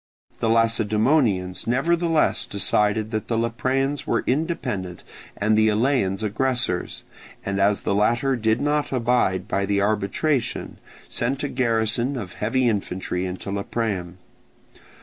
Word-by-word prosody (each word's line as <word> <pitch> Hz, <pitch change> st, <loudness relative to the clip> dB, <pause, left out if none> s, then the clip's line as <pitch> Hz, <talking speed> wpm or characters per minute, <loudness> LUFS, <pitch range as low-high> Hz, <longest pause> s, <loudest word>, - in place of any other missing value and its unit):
The 115 Hz, -, 0 dB
Lacedaemonians 110 Hz, -, +2 dB
nevertheless 165 Hz, +5 st, +1 dB
decided 105 Hz, +2 st, 0 dB
that 110 Hz, -2 st, -3 dB
the 115 Hz, -, 0 dB
Lepreans 130 Hz, +5 st, -1 dB
were -, -, +1 dB
independent 125 Hz, -, -2 dB, 0.3 s
and 110 Hz, +2 st, +2 dB
the 110 Hz, 0 st, +4 dB
Eleans 110 Hz, -3 st, +1 dB
aggressors, 120 Hz, -2 st, -1 dB, 0.4 s
and 100 Hz, 0 st, -1 dB
as 100 Hz, +1 st, +2 dB
the -, -, -1 dB
latter 120 Hz, +6 st, +2 dB
did 110 Hz, -1 st, +1 dB
not 145 Hz, 0 st, 0 dB
abide 120 Hz, -7 st, +1 dB
by 100 Hz, -3 st, -1 dB
the 100 Hz, 0 st, +1 dB
arbitration, 110 Hz, +7 st, -1 dB, 0.3 s
sent 130 Hz, +4 st, -2 dB
a -, -, 0 dB
garrison 120 Hz, +1 st, 0 dB
of 95 Hz, -7 st, -6 dB
heavy 120 Hz, +4 st, 0 dB
infantry 95 Hz, -4 st, -2 dB
into 90 Hz, +2 st, -6 dB
Lepreum. 100 Hz, -3 st, -3 dB
110 Hz, 125 wpm, -23 LUFS, 100-130 Hz, 0.4 s, the